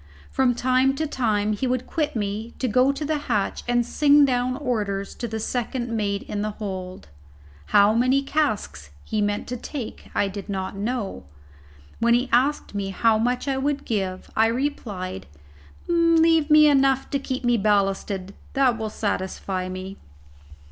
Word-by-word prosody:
From 255 Hz, -2 st, +2 dB
time 255 Hz, +2 st, +2 dB
to 315 Hz, -, -1 dB
time 215 Hz, -7 st, 0 dB
he 235 Hz, +5 st, -2 dB
would 255 Hz, 0 st, -1 dB
quit 305 Hz, -4 st, -2 dB
me 215 Hz, +2 st, -3 dB
to 260 Hz, -, -1 dB
go 255 Hz, +4 st, +4 dB
to 290 Hz, +2 st, -4 dB
the 305 Hz, 0 st, 0 dB
hatch 210 Hz, -4 st, 0 dB
and 240 Hz, 0 st, +2 dB
sing 290 Hz, +3 st, +5 dB
down 255 Hz, -1 st, 0 dB
orders 205 Hz, -8 st, -2 dB
to 240 Hz, -, -5 dB
the 220 Hz, 0 st, -4 dB
second 240 Hz, +1 st, -3 dB
mate 205 Hz, -2 st, -1 dB
in 205 Hz, -, -4 dB
the 215 Hz, -, -1 dB
hold. 185 Hz, -, -6 dB, 0.6 s
How 205 Hz, +1 st, +5 dB
many 255 Hz, +4 st, +2 dB
casks 215 Hz, -, -1 dB
he 215 Hz, -1 st, -2 dB
meant 205 Hz, 0 st, -1 dB
to 250 Hz, -, -3 dB
take 250 Hz, -1 st, -7 dB
I 200 Hz, -, +2 dB
did 195 Hz, +1 st, -7 dB
not 190 Hz, -1 st, -3 dB
know; 210 Hz, -, -3 dB, 0.7 s
when 235 Hz, +1 st, +4 dB
he 250 Hz, +1 st, 0 dB
asked 265 Hz, +2 st, +2 dB
me 200 Hz, -1 st, -2 dB
how 220 Hz, +3 st, +2 dB
much 245 Hz, +4 st, 0 dB
I 270 Hz, -1 st, 0 dB
would 285 Hz, +1 st, -1 dB
give, 190 Hz, -4 st, -3 dB
I 220 Hz, +1 st, +4 dB
replied: 215 Hz, -, -3 dB, 0.6 s
"Leave 330 Hz, -2 st, +4 dB
me 305 Hz, 0 st, +7 dB
enough 270 Hz, -2 st, +3 dB
to 280 Hz, -, 0 dB
keep 260 Hz, -1 st, -4 dB
me 240 Hz, 0 st, +3 dB
ballasted; 195 Hz, -2 st, 0 dB, 0.2 s
that 255 Hz, -4 st, +2 dB
will 220 Hz, -1 st, -2 dB
satisfy 190 Hz, -2 st, -3 dB
me." 185 Hz, +1 st, -7 dB
235 Hz, 165 wpm, -24 LUFS, 205-270 Hz, 0.7 s, me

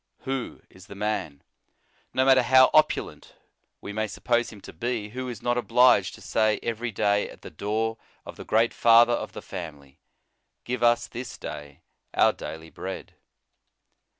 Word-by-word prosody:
Who 135 Hz, -2 st, -5 dB
is 95 Hz, -1 st, -17 dB
the 100 Hz, -, -10 dB
man, 100 Hz, -9 st, -3 dB, 0.7 s
no 130 Hz, -, +1 dB
matter 130 Hz, -1 st, +6 dB
how 130 Hz, +1 st, +6 dB
opulent 155 Hz, -, +1 dB, 0.5 s
we 105 Hz, -, -7 dB
may 110 Hz, +1 st, -1 dB
suppose 120 Hz, +3 st, 0 dB
him 105 Hz, -, -12 dB
to -, -, -11 dB
be, 120 Hz, -3 st, -3 dB
who 130 Hz, +3 st, -5 dB
is 115 Hz, -4 st, -8 dB
not 120 Hz, 0 st, +1 dB
obliged 125 Hz, -6 st, +4 dB
to -, -, -16 dB
say 110 Hz, -1 st, +1 dB
every 115 Hz, +1 st, -3 dB
day 100 Hz, 0 st, +1 dB
at -, -, -15 dB
the -, -, -9 dB
door 110 Hz, +6 st, -2 dB, 0.3 s
of -, -, -9 dB
the -, -, -9 dB
great 115 Hz, +2 st, +2 dB
Father 120 Hz, +1 st, +6 dB
of -, -, -3 dB
the -, -, -8 dB
family, 75 Hz, -7 st, -9 dB, 0.6 s
Give 125 Hz, 0 st, -4 dB
us 120 Hz, 0 st, +3 dB
this 120 Hz, +2 st, -8 dB
day 75 Hz, -1 st, -9 dB, 0.3 s
our -, -, +4 dB
daily 80 Hz, 0 st, -8 dB
bread. 95 Hz, +1 st, -7 dB
115 Hz, 165 wpm, -26 LUFS, 100-120 Hz, 0.7 s, matter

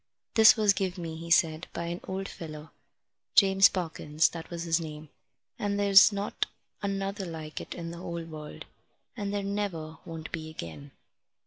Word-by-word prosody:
"This 220 Hz, 0 st, +8 dB
was 210 Hz, -3 st, +4 dB
give 190 Hz, -1 st, -2 dB
me," 165 Hz, -2 st, -5 dB
he 165 Hz, +1 st, -8 dB
said, 165 Hz, -1 st, +3 dB
"by 170 Hz, -, -3 dB
an 170 Hz, +1 st, -4 dB
old 190 Hz, +1 st, -3 dB
feller 155 Hz, -2 st, -9 dB, 0.6 s
James 195 Hz, -1 st, +7 dB
Parkins, 160 Hz, -3 st, 0 dB
that 165 Hz, -1 st, -8 dB
was 170 Hz, -1 st, -4 dB
his 165 Hz, -1 st, +2 dB
name 155 Hz, -2 st, -7 dB, 0.5 s
and 205 Hz, 0 st, -1 dB
there's 200 Hz, +1 st, +8 dB
not 200 Hz, 0 st, -2 dB, 0.3 s
another 195 Hz, -1 st, -2 dB
like 160 Hz, -2 st, -6 dB
it -, -, -8 dB
in 165 Hz, -1 st, -5 dB
the 170 Hz, -, -8 dB
whole 170 Hz, -1 st, -5 dB
world, 155 Hz, -2 st, -9 dB, 0.5 s
and 205 Hz, -3 st, -3 dB
there 205 Hz, -1 st, -1 dB
never 185 Hz, -6 st, -3 dB
won't 165 Hz, -2 st, -8 dB
be 160 Hz, -2 st, -5 dB
again." 80 Hz, -, -8 dB
170 Hz, 165 wpm, -29 LUFS, 160-195 Hz, 0.6 s, This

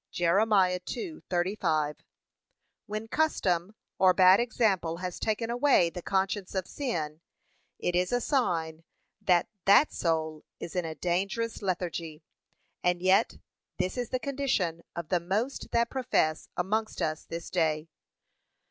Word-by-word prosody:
(Jer. 175 Hz, +1 st, +2 dB
2:35) 185 Hz, -, 0 dB, 0.9 s
When 215 Hz, +2 st, -4 dB
custom 205 Hz, -, 0 dB, 0.2 s
or 185 Hz, -1 st, +5 dB
bad 185 Hz, 0 st, +7 dB
example 205 Hz, -8 st, +1 dB
has 180 Hz, -1 st, -5 dB
taken 225 Hz, +1 st, -1 dB
away 240 Hz, -9 st, +3 dB
the 180 Hz, -, -6 dB
conscience 195 Hz, +1 st, -1 dB
of 190 Hz, -2 st, -1 dB
sin, 160 Hz, -, -3 dB, 0.6 s
it 175 Hz, -, -1 dB
is 180 Hz, 0 st, +1 dB
a 245 Hz, -, +2 dB
sign 165 Hz, -, 0 dB, 0.4 s
that 180 Hz, -4 st, +3 dB, 0.2 s
[that] 200 Hz, +10 st, +6 dB
soul 160 Hz, -2 st, -1 dB, 0.2 s
is 170 Hz, -, -7 dB
in 180 Hz, -2 st, 0 dB
a 160 Hz, -1 st, -5 dB
dangerous 195 Hz, +8 st, -1 dB
lethargy; 170 Hz, -4 st, -3 dB, 0.6 s
and 180 Hz, 0 st, +2 dB
yet 185 Hz, +2 st, +3 dB, 0.4 s
this 185 Hz, -, -1 dB
is 245 Hz, -2 st, -3 dB
the 255 Hz, -, 0 dB
condition 250 Hz, -, -1 dB
of 170 Hz, -2 st, -5 dB
the 180 Hz, -, +2 dB
most 205 Hz, +10 st, -2 dB
that 235 Hz, 0 st, +1 dB
profess 245 Hz, -12 st, 0 dB
amongst 215 Hz, +5 st, -1 dB
us 155 Hz, 0 st, -2 dB
this 165 Hz, 0 st, -7 dB
day. 160 Hz, -3 st, 0 dB
185 Hz, 130 wpm, -29 LUFS, 170-220 Hz, 0.9 s, bad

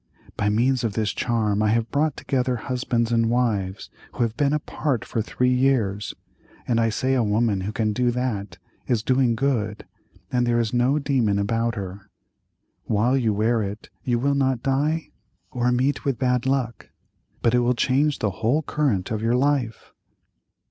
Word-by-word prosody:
By 105 Hz, -, 0 dB
means 125 Hz, +4 st, +2 dB
of 110 Hz, -3 st, -1 dB
this 110 Hz, -1 st, 0 dB
charm 110 Hz, -3 st, 0 dB
I 110 Hz, -, +2 dB
have 115 Hz, +1 st, +1 dB
brought 150 Hz, 0 st, +1 dB
together 125 Hz, -2 st, 0 dB
husbands 120 Hz, -1 st, -1 dB
and 115 Hz, -1 st, +2 dB
wives 110 Hz, -6 st, -1 dB, 0.2 s
who -, -, 0 dB
have 115 Hz, -1 st, -1 dB
been 145 Hz, -1 st, +1 dB
apart 145 Hz, -4 st, -1 dB
for 115 Hz, -, -2 dB
three 125 Hz, +3 st, 0 dB
years, 120 Hz, -6 st, +1 dB, 0.5 s
and 115 Hz, -2 st, +2 dB
I 115 Hz, 0 st, +2 dB
say 130 Hz, +4 st, 0 dB
a 130 Hz, -, +3 dB
woman 105 Hz, -2 st, +1 dB
who 100 Hz, +3 st, -3 dB
can 110 Hz, -1 st, 0 dB
do 125 Hz, +2 st, +1 dB
that 110 Hz, -7 st, -3 dB, 0.3 s
is 115 Hz, -4 st, +1 dB
doing 130 Hz, -1 st, +2 dB
good, 110 Hz, -5 st, -1 dB, 0.5 s
and 125 Hz, -1 st, +1 dB
there 120 Hz, 0 st, +2 dB
is 115 Hz, -1 st, -1 dB
no 125 Hz, +4 st, +2 dB
demon 130 Hz, -8 st, +1 dB
about 115 Hz, +3 st, 0 dB
her. 100 Hz, 0 st, -7 dB, 0.8 s
While 115 Hz, +5 st, +2 dB
you 120 Hz, -5 st, +2 dB
wear 110 Hz, +3 st, +1 dB
it 105 Hz, +1 st, -6 dB
you 120 Hz, -2 st, +1 dB
will 140 Hz, +4 st, +1 dB
not 130 Hz, -3 st, 0 dB
die 150 Hz, +4 st, 0 dB, 0.4 s
or 125 Hz, 0 st, +1 dB
meet 130 Hz, +4 st, +1 dB
with 135 Hz, -5 st, 0 dB
bad 125 Hz, +1 st, +1 dB
luck, 130 Hz, -3 st, -1 dB, 0.5 s
but 115 Hz, -, +3 dB
it 125 Hz, -, +4 dB
will 120 Hz, +1 st, +2 dB
change 140 Hz, +4 st, +2 dB
the 105 Hz, -, -1 dB
whole 115 Hz, -, 0 dB
current 130 Hz, -13 st, -1 dB
of 110 Hz, -1 st, -2 dB
your 115 Hz, +2 st, +2 dB
life." 130 Hz, -3 st, 0 dB
120 Hz, 175 wpm, -24 LUFS, 110-130 Hz, 0.8 s, it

